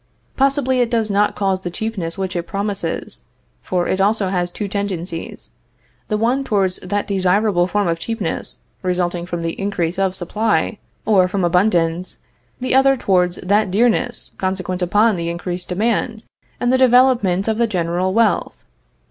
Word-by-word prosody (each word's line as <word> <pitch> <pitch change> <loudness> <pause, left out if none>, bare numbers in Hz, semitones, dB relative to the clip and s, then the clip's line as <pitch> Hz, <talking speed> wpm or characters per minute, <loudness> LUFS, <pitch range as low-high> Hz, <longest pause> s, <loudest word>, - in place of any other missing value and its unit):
Possibly 270 -1 +2
it 240 -2 +2
does 225 -3 0
not 205 +1 +2
cause 195 -2 0
the 180 - -4
cheapness 190 -4 -4
which 190 -1 -3
it 170 -1 -3
promises; 200 +1 -3 0.4
for 180 -1 -1
it 190 - 0
also 200 -1 +2
has 180 -2 -1
two 205 +3 -4
tendencies, 185 -4 -4 0.6
the 215 - 0
one 245 +5 +1
towards 195 -6 0
that 205 +3 -2
desirable 190 -1 +2
form 205 +1 0
of 165 0 -1
cheapness 210 -1 -4 0.2
resulting 175 -1 -1
from 175 -2 -4
the 165 - -1
increase 185 -3 -1
of 190 -1 +1
supply, 205 +2 0 0.3
or 195 -4 +4
from 190 0 -2
abundance; 175 -1 +1 0.4
the 255 0 -1
other 270 +1 +5
towards 180 -5 +2
that 200 +2 +2
dearness 220 +5 +1
consequent 185 -1 -2
upon 205 +4 +3
the 170 0 -2
increased 175 +1 -5
demand 220 +3 -1 0.3
and 245 +1 +1
the 260 - +3
development 245 -7 +4
of 220 0 0
the 235 - +3
general 180 -1 -1
wealth. 225 +1 +1
195 Hz, 155 wpm, -19 LUFS, 180-220 Hz, 0.6 s, other